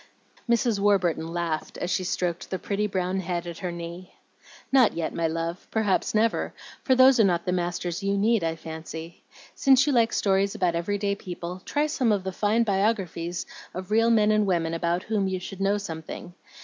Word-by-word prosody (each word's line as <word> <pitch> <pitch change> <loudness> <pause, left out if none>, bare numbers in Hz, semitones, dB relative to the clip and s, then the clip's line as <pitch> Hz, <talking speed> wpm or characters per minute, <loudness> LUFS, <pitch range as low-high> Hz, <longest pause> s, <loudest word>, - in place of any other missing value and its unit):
Mrs. 235 -2 +2
Warburton 185 -5 +2
laughed, 165 -2 -3
as 180 - -3
she 185 - 0
stroked 180 -1 -2
the 185 - -2
pretty 205 +2 -1
brown 185 -1 -1
head 175 -1 -3
at 170 -1 -7
her 180 -2 -3
knee. 170 +2 -8 0.6
"Not 260 -4 +5
yet, 165 -1 -3
my 165 -1 0
love, 165 +2 -4
perhaps 215 -2 0
never, 225 +1 +1 0.3
for 260 - +3
those 260 0 +6
are - - +7
not 175 -3 +1
the 180 - 0
masters 175 0 -2
you 200 0 0
need, 215 -1 +2
I 165 0 0
fancy. 160 +1 -8 0.3
Since 270 -1 +4
you 290 - +1
like 230 -2 +3
stories 195 0 +1
about 180 -2 +1
every 175 +5 -1
day 200 0 0
people, 180 -2 -7
try 295 +1 +1
some 270 -6 +1
of 200 -3 +1
the 190 - -3
fine 210 +4 +2
biographies 195 -5 -1 0.3
of 185 +2 -6
real 225 +2 +4
men 215 -2 +4
and 215 -1 +2
women 165 -3 0
about 170 +2 0
whom 210 -3 0
you 190 -1 -2
should 195 +1 -8
know 200 +1 +2
something. 175 -2 -7
190 Hz, 195 wpm, -26 LUFS, 170-210 Hz, 0.6 s, are